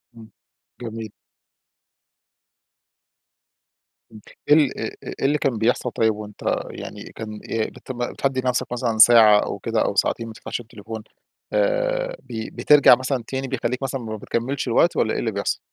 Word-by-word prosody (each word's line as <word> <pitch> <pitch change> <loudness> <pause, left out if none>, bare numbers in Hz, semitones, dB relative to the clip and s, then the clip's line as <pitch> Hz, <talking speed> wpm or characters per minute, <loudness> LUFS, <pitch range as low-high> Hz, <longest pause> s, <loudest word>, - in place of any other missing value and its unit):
امم. 110 -1 -13 0.5
جميل. 110 -2 -6 3.0
امم، 110 -1 -13 0.3
إيه - - +8
ال 145 -4 +2
أ - - -3 0.2
إيه - - -6
اللي 145 +2 +3
كان 130 -5 0
بيحصَل 120 +2 +1
طيّب 110 -1 +1
وأنت 105 -1 -10 0.3
يعني - - -8
كان 110 -1 -7
إ 110 -1 -1
بت - - -10
بتحدّد 130 +1 -2
لنفْسك 125 -1 0
مثلًا 120 -2 -1
ساعة 110 -2 +8
أو - - -3
كده - - -1
أو - - -1
ساعتين 115 - 0
ما 110 - -8
تفتَحش 115 - -5
التليفون 110 -1 -9 0.5
آآ، - - 0
ب 110 -1 -7
بترجع 145 -4 +7
مثلًا 130 -1 -2
تاني، 135 0 -3
بيخلّيك 125 0 -2
مثلًا 135 -1 -3
ما 110 -1 -5
بتكمّلش 125 +6 -3
الوقت 145 +9 +3
والّا 110 - +1
إيه - - -1
اللي 115 - -1
بيحصل؟ 100 0 -2
120 Hz, 155 wpm, -22 LUFS, 110-135 Hz, 3.0 s, إيه